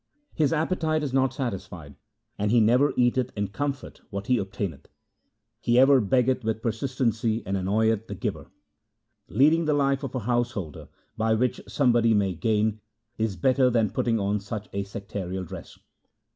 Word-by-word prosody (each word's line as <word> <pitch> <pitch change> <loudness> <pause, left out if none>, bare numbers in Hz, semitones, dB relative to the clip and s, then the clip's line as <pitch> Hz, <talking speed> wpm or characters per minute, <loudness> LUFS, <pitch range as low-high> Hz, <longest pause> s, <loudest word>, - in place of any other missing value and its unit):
His 155 -3 +1
appetite 160 -1 0
is 135 -3 -3
not 130 -1 +2
satisfied, 95 - -5 0.4
and 105 +1 -1
he 120 +2 +4
never 125 +6 +4
eateth 125 0 +2
in 100 -1 -1
comfort 140 +5 -4
what 100 0 -5
he 125 0 +2
obtaineth. 95 -5 -5 0.7
He 120 0 +1
ever 135 0 +6
beggeth 125 +4 +1
with 110 0 -2
persistency 115 -2 -1
and 95 - -2
annoyeth 110 +3 +1
the - - -6
giver. - - -4 0.8
Leading 150 - +3
the 150 -1 +2
life 140 -1 +1
of 135 - -5
a - - 0
householder, 120 - -2 0.3
by 110 0 +2
which 125 +3 0
somebody 120 -4 +3
may 100 -2 +1
gain, 110 +4 0 0.4
is 110 -3 0
better 130 +7 +3
than 115 -4 +1
putting 115 -2 0
on 100 +1 0
such 105 +1 -6
a 100 0 -2
sectarial 95 -2 -5
dress. - - -10
115 Hz, 160 wpm, -26 LUFS, 100-130 Hz, 0.8 s, ever